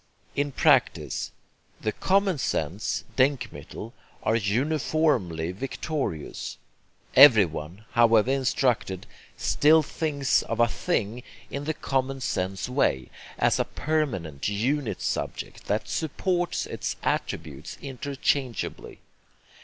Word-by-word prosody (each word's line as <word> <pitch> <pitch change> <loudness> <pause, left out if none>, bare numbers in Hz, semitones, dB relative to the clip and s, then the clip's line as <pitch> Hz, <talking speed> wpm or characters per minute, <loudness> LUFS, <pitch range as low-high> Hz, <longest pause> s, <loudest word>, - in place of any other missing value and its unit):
In 145 0 0
practice, 125 - +2 0.5
the 110 - -1
common 190 - +1
sense 85 -1 -1
DENKMITTEL 130 -4 -1 0.3
are 110 - +2
uniformly 115 - +1
victorious. 135 - -4 0.6
Everyone, 100 - +6
however 115 0 +5
instructed, 125 -7 0 0.3
still 155 +2 +4
thinks 145 -3 +1
of 115 - -4
a 120 - +6
'thing' 115 - -1 0.3
in 140 +1 -4
the 155 0 -1
common 135 0 -1
sense 95 -5 -2
way, 95 - +1 0.3
as - - +2
a - - +4
permanent 105 - -2
unit 125 +6 -1
subject - - -3
that - - 0
'supports' 175 +3 -1
its - - -4
attributes 75 -3 -3
interchangeably. 135 -1 -2
125 Hz, 100 wpm, -26 LUFS, 100-145 Hz, 0.6 s, Everyone